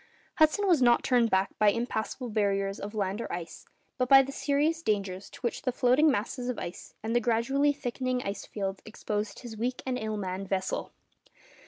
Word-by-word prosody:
Hudson 315 +6 +4
was 345 -8 +4
not 240 -1 +5
turned 240 -3 +3
back 190 -1 +2
by 210 -1 +6
impassable 230 +2 -2
barriers 195 -2 0
of 205 +2 -6
land 200 +1 -1
or - - -5
ice, 170 -2 -7 0.3
but 250 0 +1
by 270 0 +9
the 270 - -6
serious 295 +4 0
dangers 200 - -2
to - - -13
which 240 -2 -2
the 255 - 0
floating 255 +5 +4
masses 250 0 -2
of 250 - -2
ice 175 - -7
and 225 +2 -1
the - - +5
gradually 240 +5 +2
thickening 255 -2 -2
ice 200 0 -5
fields 195 -2 -4
exposed 210 -1 -4
his 240 -3 -8
weak 245 +3 -3
and 255 -1 -1
ill 215 -1 -3
manned 190 -1 -4
vessel. 190 -1 -2
230 Hz, 190 wpm, -29 LUFS, 200-255 Hz, 0.3 s, by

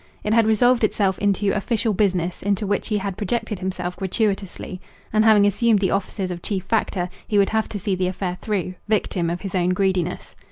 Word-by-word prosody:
It 210 - 0
had 230 -1 +4
resolved 235 +2 +4
itself 195 -3 +1
into 200 0 +1
official 220 +1 0
business 180 -3 0
into 200 +1 0
which 205 0 -1
he 215 - 0
had 195 -2 -3
projected 220 0 -2
himself 180 -1 -3
gratuitously; 195 -2 -2 0.3
and 215 0 +4
having 215 -2 +6
assumed 220 +2 +3
the 195 -1 +1
offices 195 -1 -2
of 175 -1 -5
chief 195 -2 -2
factor, 195 -4 0 0.2
he 210 - +1
would 200 -1 +4
have 220 0 0
to 210 - -4
see 195 +1 -1
the 185 0 0
affair 185 -1 -3
through, 195 -4 -2
victim 195 -5 0
of 175 +1 -3
his 195 -3 -5
own 180 -1 +2
greediness. 185 -2 -1
200 Hz, 200 wpm, -22 LUFS, 185-215 Hz, 0.3 s, having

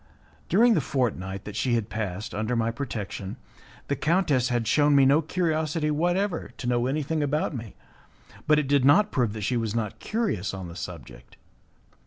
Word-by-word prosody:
During 230 +6 +5
the - - +2
fortnight 100 -8 -2
that 105 - -7
she 120 +2 +1
had 115 -3 -1
passed 105 -1 -4
under 110 +4 -1
my 115 0 +1
protection, 110 -6 -5 0.5
the 140 - 0
countess 150 -4 +1
had 120 -2 0
shewn 145 -1 +4
me 135 -1 +6
no 140 +4 +5
curiosity 155 -2 0
whatever 175 +4 0
to - - -7
know 120 0 +1
anything 150 +3 -1
about 150 +1 0
me, 115 -4 -7 0.7
but 150 0 +5
it 150 -2 +1
did 140 -1 +3
not 200 +10 +5
prove 120 -5 0
that 110 - -6
she 120 +5 0
was 115 -2 -2
not 110 -3 -3
curious 205 - -2
on 95 -2 -7
the 85 - -10
subject. 70 -9 -9
130 Hz, 180 wpm, -26 LUFS, 105-155 Hz, 0.7 s, me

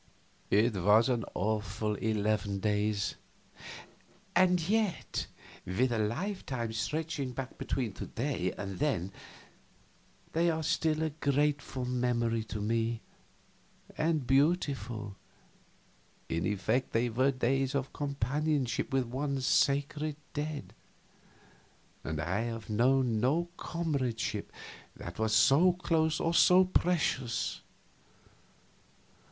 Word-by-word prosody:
It 110 +3 +4
was 105 +6 +4
an 120 -5 0
awful 105 +1 -1
eleven 105 -1 0
days; 105 0 0 1.2
and 180 -1 +5
yet, 215 -2 0 0.4
with 120 +8 0
a 115 - 0
lifetime 120 - -2
stretching 150 +1 -2
back 130 0 -6
between 120 -7 -2
to - - -6
day 115 -8 -2
and 100 -2 -5
then, 125 - 0 1.2
they 170 +1 +3
are 160 -1 -1
still 155 +1 +1
a 160 - -1
grateful 145 -3 0
memory 120 -2 0
to 110 -1 -5
me, 115 +2 0 0.9
and 155 -4 0
beautiful. 135 - +1 1.1
In 80 0 0
effect 110 +5 0
they 115 +2 +2
were 130 +4 +2
days 135 +1 0
of 135 -1 -2
companionship 140 -2 -1
with 135 -1 +1
one's 135 +2 -2
sacred 145 +2 +1 0.2
dead, 150 0 -4 1.3
and 80 -1 -3
I 90 +6 -1
have 115 -2 -4
known 120 +1 +3
no 160 +9 +1
comradeship 130 - -2 0.4
that 85 +3 -8
was 110 0 +2
so 145 +11 +6
close 160 -3 +1
or 165 - 0
so 180 +2 +6
precious. 160 -9 0
125 Hz, 105 wpm, -31 LUFS, 110-150 Hz, 1.3 s, so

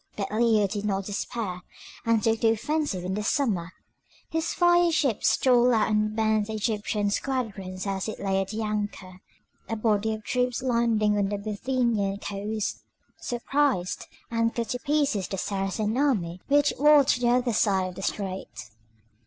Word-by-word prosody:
But 200 0 -3
Leo 220 -2 +3
did 200 +1 -3
not 195 -2 -1
despair, 200 -2 -4 0.5
and 230 -2 +3
took 225 -1 +1
the 225 - +4
offensive 290 - -2
in 185 +1 -2
the 210 - -2
summer. 210 - 0 0.6
His 325 0 -1
fire 350 -1 +4
ships 275 -8 +2
stole 245 -1 +4
out 220 0 +2
and 215 0 +1
burnt 220 -1 +1
the 220 - -5
Egyptian 210 -1 -1
squadron 205 -7 -3
as 195 0 -2
it 215 - -5
lay 195 -1 0
at 195 - -5
anchor. 210 -4 -4 0.5
A 225 - -1
body 220 0 +1
of 215 - -11
troops 250 +2 -1
landing 230 -4 +2
on 195 -1 +1
the 205 - -2
Bithynian 215 -1 -1
coast, 205 +1 -3 0.4
surprised 245 -5 -1 0.2
and 230 0 0
cut 235 -1 -2
to 250 - -2
pieces 280 -9 0
the 195 - -4
Saracen 200 +3 -2
army 200 -11 0
which 290 0 +3
watched 290 -3 +5
the 240 - +3
other 245 -1 +2
side 195 -3 +2
of 180 - -11
the 195 - -7
strait. 190 - -5
215 Hz, 160 wpm, -26 LUFS, 200-245 Hz, 0.6 s, watched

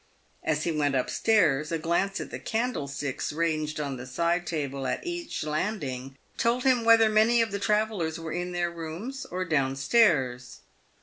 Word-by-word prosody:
As 155 -1 0
he 170 - 0
went 145 -3 +1
up 130 - 0
stairs, 155 -10 +2
a 165 - +1
glance 170 +5 0
at - - -6
the - - -5
candlesticks 145 - -2
ranged 155 -1 -1
on 140 -3 -3
the 125 +1 -8
side 170 +6 0
table 140 -4 -3
at - - -3
each 345 - -4
landing, 145 -6 -3 0.2
told 240 +2 +2
him 255 -3 +3
whether 225 -1 +6
many 220 +2 +4
of 225 -2 +1
the 200 - -2
travellers 210 -7 0
were 165 -1 -6
in 180 +1 -3
their 175 -1 -1
rooms 170 +11 -6
or 185 +1 -3
down 140 -5 +1
stairs. 135 - +2
165 Hz, 175 wpm, -27 LUFS, 145-215 Hz, 0.2 s, whether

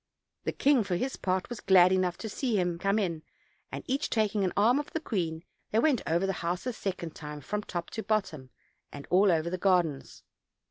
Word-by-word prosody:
The - - 0
king, 275 -4 +3
for 190 -3 -2
his 260 +9 -2
part, 185 0 -1
was 240 -3 -6
glad 185 -1 +6
enough 185 -2 +1
to 225 - -6
see 235 +2 -1
him 175 -2 -1
come 195 +3 +1
in;j 170 -7 -1 0.5
and, - - -5
each 270 +3 -1
taking 215 -2 +1
an 185 - +1
arm 235 +7 +4
of 295 - -5
the 320 - 0
queen, 170 - -3 0.3
they 215 - 0
went 260 +1 +3
over 170 +4 +1
the 195 - 0
house 175 +4 -2
a 250 - -2
second 180 -6 -4
time 150 -1 -8
from 210 +9 -3
top 175 -4 -5
to 220 - -4
bottom, 190 -11 -2 0.4
and 140 -1 -9
all 190 +2 +5
over 165 0 0
the 185 - -3
gardens. 175 -7 0
190 Hz, 215 wpm, -29 LUFS, 170-215 Hz, 0.5 s, glad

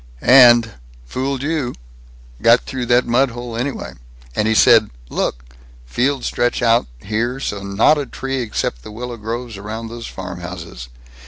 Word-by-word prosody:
"And 120 -3 +7 0.3
Fooled 130 - -3
you! 145 -5 -2 0.7
Got 115 +1 +5
through 125 -2 -5
that 120 +1 +4
mudhole, 120 -1 0
anyway! 130 +4 -4 0.4
And 105 - +1
he 110 - +2
said 110 -1 +6 0.2
Look! - - -2 0.4
Fields 130 - -1
stretch 120 0 0
out 115 - +3
so - - -18
here, 120 +5 -1
and 100 -1 -7
not 150 +7 +5
a 140 - -4
tree 135 -1 -4
except 105 - -3
the 105 - -10
willow 120 +2 -6
groves 115 0 -5
round 110 +3 -6
those 115 0 -7
farmhouses. 90 -9 -8
120 Hz, 150 wpm, -19 LUFS, 105-125 Hz, 0.7 s, And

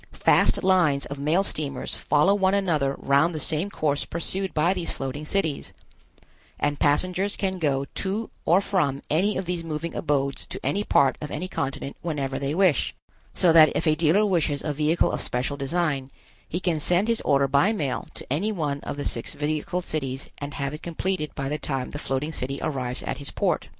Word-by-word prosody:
Fast - - +3
lines 175 -7 +3
of 140 0 -7
mail 155 +7 +2
steamers 140 -8 -1
follow 150 +6 +3
one 195 -1 +2
another 155 -9 +1
around 140 +6 +2
the 155 - -3
same 160 +6 +1
course 150 -6 0
pursued 185 +3 -1
by 160 +4 +2
these 180 -3 -3
floating 135 +3 -4
cities, 165 -7 -1 0.9
and 145 0 0
passengers 185 +7 +1
can 190 -2 -1
go 140 -4 +1
to 205 +4 -3
or 175 +4 +4
from 150 -9 0
any 190 +7 +2
of 190 - -2
these 175 -1 -3
moving 165 +1 -4
abodes 140 -3 -1
to - - -6
any 170 +10 +1
part 140 -9 +3
of 150 - -5
any 185 - -4
continent 140 -5 -4
whenever 140 -5 -2
they 140 +2 -2
wish; 180 -7 +2 0.4
so 170 -3 +4
that 155 -1 +8
if - - 0
a 155 - +4
dealer 165 +6 +3
wishes 165 -7 +1
a 150 - -1
vehicle 155 +3 +2
of - - -2
special 125 +3 -1
design, 140 -2 -1 0.4
he 175 - -2
can 175 -4 0
send 180 +7 +2
his 230 -1 +1
order 140 -1 +3
by 140 +10 +3
mail 145 - -2
to - - -6
any 200 +9 0
one 150 -8 -2
of 140 - -6
the 145 - -3
six 115 - -1
vehicle 155 +4 -2
cities 135 -5 -4
and 145 0 -6
have 140 0 -2
it 150 - -7
completed 170 -1 -2
by 135 - -3
the 150 +2 -2
time 135 -3 -3
the 145 - -5
floating 135 +3 -2
city 135 -2 -3
arrives 130 -5 0
at - - -3
his 140 - -5
port. - - 0
155 Hz, 195 wpm, -25 LUFS, 140-180 Hz, 0.9 s, that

